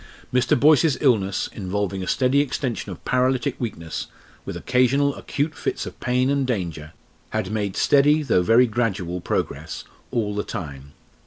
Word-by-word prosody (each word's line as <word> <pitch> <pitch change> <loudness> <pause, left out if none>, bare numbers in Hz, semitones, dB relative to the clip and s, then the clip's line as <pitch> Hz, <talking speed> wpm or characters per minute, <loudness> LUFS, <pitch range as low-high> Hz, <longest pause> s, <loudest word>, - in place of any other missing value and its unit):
Mr. 125 -1 +3
Boyce's 150 0 +5
illness, 100 -8 +2
involving 100 -1 -2
a 95 - -5
steady 130 +1 +2
extension 125 -6 -2
of 90 - -10
paralytic 130 +1 +1
weakness, 85 -9 -4 0.4
with - - -5
occasional 135 +3 +2
acute 145 +4 -2
fits - - -3
of - - -9
pain 125 +1 +1
and 140 -2 +1
danger, 85 -9 -3 0.4
had 95 - -2
made 105 -3 -2
steady 145 +2 +4
though 115 -10 +3
very 115 +7 +5
gradual 100 -7 -2
progress - - -3 0.3
all 105 -3 -1
the 105 0 -2
time. 70 -4 -7
120 Hz, 150 wpm, -23 LUFS, 95-130 Hz, 0.4 s, Boyce's